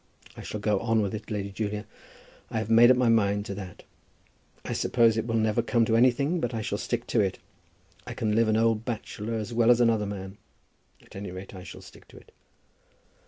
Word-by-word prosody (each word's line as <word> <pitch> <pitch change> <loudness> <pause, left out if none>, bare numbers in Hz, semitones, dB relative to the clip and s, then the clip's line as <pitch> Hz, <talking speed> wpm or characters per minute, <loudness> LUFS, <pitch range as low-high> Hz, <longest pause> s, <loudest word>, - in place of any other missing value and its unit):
I - - -9
shall 105 - -6
go 105 -1 +1
on 115 -1 +1
with 100 - -3
it, 110 +1 -7
Lady 100 -2 -3
Julia. 105 +1 -4 0.6
I - - -3
have 110 0 -2
made 115 +2 +7
up 130 - +5
my 125 -1 +2
mind 105 -3 +2
to 100 - -5
that. 95 -3 -9 0.8
I - - -3
suppose 115 -3 +3
it 110 +1 -2
will 115 - -1
never 110 -1 +2
come 115 -2 +1
to 115 - +1
anything, 140 +8 +3
but 120 -5 -2
I 110 - -3
shall 100 0 -3
stick 120 0 -3
to 120 - 0
it. 95 -2 0 0.7
I - - -6
can 110 -2 -1
live 115 0 +3
an 110 0 +2
old 115 -1 +2
bachelor 115 -1 -5
as 110 +1 -4
well 115 0 +3
as 120 -1 +6
another 115 -3 +2
man. 95 0 -7 0.6
At - - -18
any 100 0 -6
rate 95 +2 -9
I 95 - -9
shall 90 - -11
stick - - -16
to - - -16
it." - - -17
110 Hz, 220 wpm, -27 LUFS, 105-115 Hz, 0.8 s, made